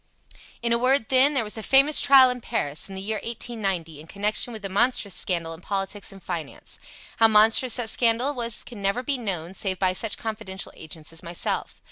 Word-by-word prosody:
"In 235 0 +2
a 235 - +2
word, 255 -2 +2
then, 270 +3 +5
there 255 - +2
was 215 +1 -3
a - - -5
famous 275 +6 +5
trial 270 -2 +7
in 250 0 -6
Paris, 155 -9 -2
in 195 - -8
the 190 - -6
year 215 +2 -1
1890, 195 -9 -3
in 160 - -15
connection 210 +6 -1
with 215 -3 -8
a - - 0
monstrous 205 0 +1
scandal 170 -3 -1
in 165 - -12
politics 200 +2 -4
and 195 -2 -14
finance. 165 -6 -6 0.4
How 225 - +6
monstrous 220 +3 +5
that 245 -3 -2
scandal 240 +4 +2
was 235 -4 0
can 230 -4 -10
never 200 +6 0
be 275 -1 -1
known 185 -6 -4
save 190 -2 -2
by 185 0 +1
such 215 +3 -2
confidential 215 -4 -5
agents 160 0 -8
as 165 - -4
myself. 170 -1 -4
215 Hz, 205 wpm, -24 LUFS, 190-240 Hz, 0.4 s, trial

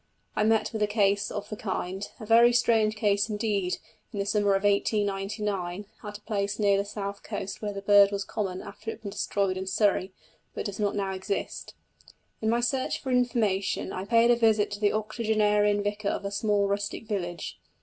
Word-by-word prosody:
I 215 - +2
met 220 +1 +2
with 220 - -3
a 210 - +3
case 205 -1 +2
of 205 - -5
the 215 - -4
kind, 190 -1 -4
a 215 - -7
very 230 +2 +6
strange 225 -3 +3
case 205 0 +1
indeed, 205 -4 -1 0.3
in 210 - -7
the 200 - -1
summer 205 -1 +2
of 195 - -1
1899, 200 -2 0 0.2
at 210 -1 -6
a - - -26
place 205 -1 -2
near 200 -2 +3
the 200 +1 0
south 200 -1 -5
coast 195 - -5
where 210 -1 -2
the 200 0 -7
bird 200 0 +6
was 200 0 -2
common 190 -2 -4
after 225 - -8
it - - -2
had 220 - -23
been 200 - -5
destroyed 195 -2 -1
in 190 0 -4
Surrey, 195 -1 +1 0.4
but - - -4
does 200 0 -5
not 205 -1 0
now 195 -1 -1
exist. 190 +1 -4 0.7
In 220 - +1
my 235 +1 +2
search 260 +2 0
for 260 - -4
information 225 -7 +1
I 185 - -4
paid 230 +2 +5
a - - +6
visit 220 -3 +3
to 205 - -5
the 205 -1 +3
octogenarian 210 -1 +1
vicar 205 0 -1
of 200 - -3
a 200 - -2
small 205 -1 +1
rustic 200 +2 -2
village. 175 -5 -4
205 Hz, 200 wpm, -27 LUFS, 200-215 Hz, 0.7 s, very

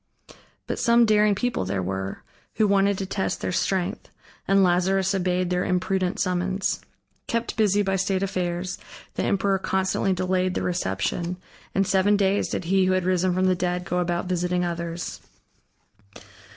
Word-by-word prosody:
But - - -3
some 235 0 +5
daring 210 -1 +4
people 245 - -1
there 95 0 -2
were, 95 +1 -4 0.3
who 215 - +3
wanted 200 0 +3
to 195 - -3
test 190 0 -2
their - - -2
strength, 185 0 -1 0.4
and 195 0 +4
Lazarus 190 +2 +2
obeyed 180 -1 0
their 180 0 +1
imprudent 185 0 0
summons. 185 +1 -1 0.5
Kept 230 0 -2
busy 205 -2 +3
by 195 -1 0
state 190 0 0
affairs, 180 -1 -2 0.3
the - - -2
emperor 195 -1 +1
constantly 190 +1 0
delayed 185 0 0
the - - -1
reception, 170 - -2 0.4
and 195 - +3
seven 195 +2 +3
days 200 0 +1
did - - -3
he 190 +2 +2
who 185 - +3
had 185 -1 0
risen 185 0 +1
from 185 0 +2
the 185 - +4
dead 180 0 -2
go 180 +1 -1
about 175 0 -1
visiting 180 0 0
others. 170 0 -4
185 Hz, 160 wpm, -25 LUFS, 180-195 Hz, 0.5 s, some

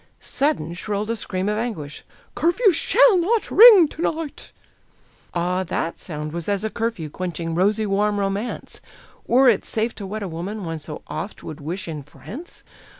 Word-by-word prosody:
Sudden 270 - 0
shrilled 205 +4 -3
a - - -1
scream 190 -3 -3
of 210 +1 0
anguish: 165 -12 -5 0.3
"Curfew 385 +6 +3
SHALL 415 +5 +4
not 425 +6 0
ring 420 -7 +9
to 315 - -8
night!" 320 -3 -3 0.8
Ah, 180 +2 0
that 165 -1 -3
sound 150 -3 -6
was 170 +3 -4
as 200 0 0
a 220 - -2
curfew, 225 -8 -3
quenching 165 0 -4
rosy 205 +5 +2
warm 205 +1 +1
romance! 200 +4 -3 0.5
Were 260 +2 +5
it 225 -5 +4
safe 225 +1 -2
to 200 -3 -6
wed 215 +2 -4
a - - -3
woman 185 +5 -5
one 165 -1 -4
so 150 0 -8
oft 200 - -6
would 155 0 -8
wish 175 +6 -4
in 155 -3 -5
France? 230 - -11
205 Hz, 170 wpm, -22 LUFS, 170-240 Hz, 0.8 s, ring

